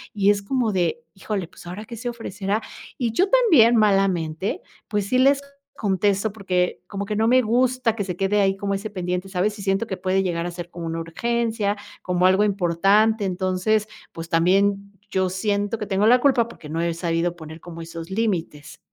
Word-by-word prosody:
es 200 0 +3
como 245 0 0
de 175 -4 0 0.2
híjole, 195 -2 -4
pues, - - -16
¿ahora 190 +5 -7
qué 235 - -8
se 235 +2 -4
ofrecerá?, 210 -3 -3 0.4
y 240 -3 -1
yo 370 +11 +2
también 325 - +5
malamente, 195 -5 +1 0.3
pues, 205 -2 -1
sí 255 - +2
les 275 +2 +4 0.3
contesto 200 0 0
porque 185 -4 -1
como 200 0 -4
que 210 +1 -3
no 220 +1 +2
me 255 +2 +5
gusta 245 0 +1
que 205 - -2
se 180 -2 -4
quede 195 +2 +1
ahí 195 -1 +2
como 200 0 -2
ese 205 +2 -5
pendiente, 180 -1 -3
¿sabes? 200 +3 -1
Y - - -8
siento 195 +3 +1
que 190 - -4
puede 185 +1 +1
llegar 170 -2 -2
a 175 - -3
ser 175 0 -7
como 170 -1 -7
una 165 0 -3
urgencia, 220 +4 -1 0.3
como 180 0 +1
algo 190 +3 +4
importante. 200 +3 +2
Entonces, 190 +3 0 0.2
pues, 165 0 -7
también 195 +4 +2 0.2
yo 190 -1 0
siento 205 +3 -1
que 210 - -3
tengo 200 +1 +1
la 250 +2 +6
culpa 255 -4 +3
porque 165 -9 -12
no 160 +2 -3
he 170 - 0
sabido 170 0 -1
poner 160 -1 -10
como 165 0 -9
esos 165 +1 -8
límites. 180 -8 -3
195 Hz, 195 wpm, -23 LUFS, 180-220 Hz, 0.4 s, la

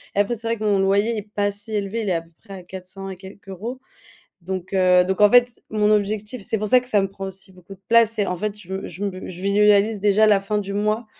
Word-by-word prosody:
Et - - +1
après, 205 +4 +1
c'est 230 0 -7
vrai 230 0 0
que 215 - -6
mon 205 -2 +2
loyer 200 +4 +2
est 210 0 -7
pas 205 0 +1
si 205 +2 -9
élevé, 205 +2 -2
il 210 - -2
est - - +2
à 165 - -1
peu 165 - -24
près 200 - -11
à 185 - -10
400 190 +2 -9
et 190 - -6
quelques 195 +1 -13
euros. 225 +8 -6 0.6
Donc 185 +1 -5
heu, 180 -1 +5
donc 190 +2 -1
en 205 - +7
fait, 245 -1 +4
mon 210 -1 +2
objectif 210 +2 -1
c'est 220 - -1
pour 210 0 -3
ça 255 - +6
que 250 - -10
ça 210 -5 +3
me 195 - -1
prend 195 0 -8
aussi 190 0 -8
beaucoup 185 +1 -13
de 190 - -24
place, 230 -1 +5
c'est 210 -3 -1
en 180 - -2
fait, 210 +2 -3
je 190 -3 -14
me 190 0 -4
je 180 +3 -9
me 190 -2 -4
je 180 -1 -9
visualise 205 +1 +3
déjà 210 +2 +3
la 205 -2 +4
fin 210 +2 -2
du 200 -1 -4
mois, 215 +2 -1
200 Hz, 285 wpm, -22 LUFS, 190-215 Hz, 0.6 s, en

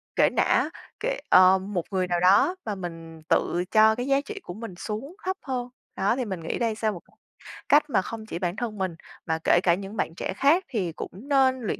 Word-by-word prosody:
kể - - +5
nã - - +2 0.3
kệ - - -2
ờ, 185 +1 +7
một 190 -3 -3
người 185 -2 0
nào 175 -1 0
đó 195 - +4
và 210 - -2
mình 165 -3 -8
tự 175 0 +1
cho 220 0 +6
cái 245 +2 -3
giá 275 0 +3
trị 415 +6 -8
của - - -7
mình 215 -2 -8
xuống 220 - -6
thấp 375 +1 -1
hơn. 250 -3 -3 0.3
Đó, 195 +4 +1
thì 255 -1 -2
mình 190 -5 -4
nghĩ 165 - -3
đây 230 -2 0
sẽ 220 0 -2
là - - +3
một 175 -4 -8 0.7
cách 295 +1 +5
mà 190 - +2
không 220 +3 -7
chỉ 175 - -5
bản 175 -1 -2
thân 220 -1 -4
mình, 185 -3 -2 0.3
mà 160 0 0
kể 175 - +5
cả 170 - +4
những 195 +3 -5
bạn 165 - -2
trẻ - - -3
khác 320 +7 +4
thì 200 -10 -2
cũng 160 - -7
nên 260 +4 +2
luyện 220 - -3
210 Hz, 235 wpm, -26 LUFS, 180-255 Hz, 0.7 s, ờ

